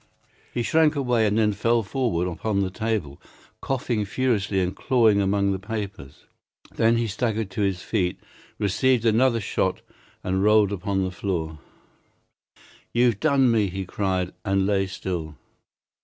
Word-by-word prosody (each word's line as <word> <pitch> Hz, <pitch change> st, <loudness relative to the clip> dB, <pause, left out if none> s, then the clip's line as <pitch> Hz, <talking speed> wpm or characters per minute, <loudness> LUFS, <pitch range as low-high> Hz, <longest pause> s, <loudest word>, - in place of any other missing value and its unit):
He 120 Hz, -, -2 dB
shrank 160 Hz, +3 st, +3 dB
away 125 Hz, -5 st, +2 dB
and 105 Hz, +1 st, 0 dB
then 105 Hz, -2 st, +3 dB
fell 115 Hz, +2 st, +1 dB
forward 95 Hz, -6 st, -1 dB
upon 100 Hz, +4 st, -1 dB
the 95 Hz, -1 st, -1 dB
table, 95 Hz, -9 st, -3 dB, 0.4 s
coughing 120 Hz, -5 st, -1 dB
furiously 105 Hz, -2 st, 0 dB
and 90 Hz, 0 st, -1 dB
clawing 115 Hz, -6 st, +3 dB
among 100 Hz, 0 st, +1 dB
the 95 Hz, -, -2 dB
papers. 100 Hz, -, -7 dB, 0.5 s
Then 115 Hz, +1 st, +3 dB
he 115 Hz, -, 0 dB
staggered 110 Hz, -1 st, -2 dB
to 100 Hz, -, -3 dB
his 95 Hz, -3 st, -1 dB
feet, 90 Hz, -5 st, -1 dB, 0.4 s
received 120 Hz, +4 st, +1 dB
another 115 Hz, +2 st, +3 dB
shot, 105 Hz, -, -1 dB, 0.4 s
and 95 Hz, +1 st, 0 dB
rolled 105 Hz, -1 st, +4 dB
upon 95 Hz, 0 st, -1 dB
the 95 Hz, -, -2 dB
floor. 85 Hz, -4 st, -3 dB, 1.3 s
"You've 120 Hz, -3 st, +2 dB
done 140 Hz, -5 st, +3 dB
me," 110 Hz, -3 st, +2 dB
he 95 Hz, +1 st, -5 dB
cried, 95 Hz, -1 st, -2 dB
and 95 Hz, -1 st, +1 dB
lay 95 Hz, -1 st, +1 dB
still. 85 Hz, -5 st, -5 dB
100 Hz, 145 wpm, -24 LUFS, 95-115 Hz, 1.3 s, rolled